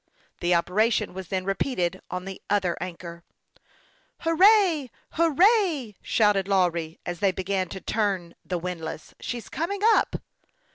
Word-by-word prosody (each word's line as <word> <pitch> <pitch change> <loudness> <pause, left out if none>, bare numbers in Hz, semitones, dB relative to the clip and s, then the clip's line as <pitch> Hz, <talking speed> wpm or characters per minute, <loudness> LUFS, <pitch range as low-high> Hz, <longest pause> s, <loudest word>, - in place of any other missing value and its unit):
The 175 0 +2
operation 210 +7 +1
was 190 -1 -7
then 185 0 -2
repeated 195 -3 -1
on 180 0 -4
the 195 -1 -7
other 190 -4 +1
anchor. 170 -1 -7 0.5
" - - -35
Hurrah! 350 -3 +4 0.2
hurrah! 335 - +3
" - - -47
shouted 205 -3 +2
Lawry, 170 -4 0
as 175 -1 -4
they 195 0 +3
be 185 - -5
gan 185 -1 -1
to 190 - -6
turn 195 -6 -1
the 180 - -3
windlass. 165 -3 -6
" - - -54
She's 240 -2 -5
coming 385 +5 -3
up." 450 0 +4
195 Hz, 150 wpm, -26 LUFS, 180-280 Hz, 0.5 s, Hurrah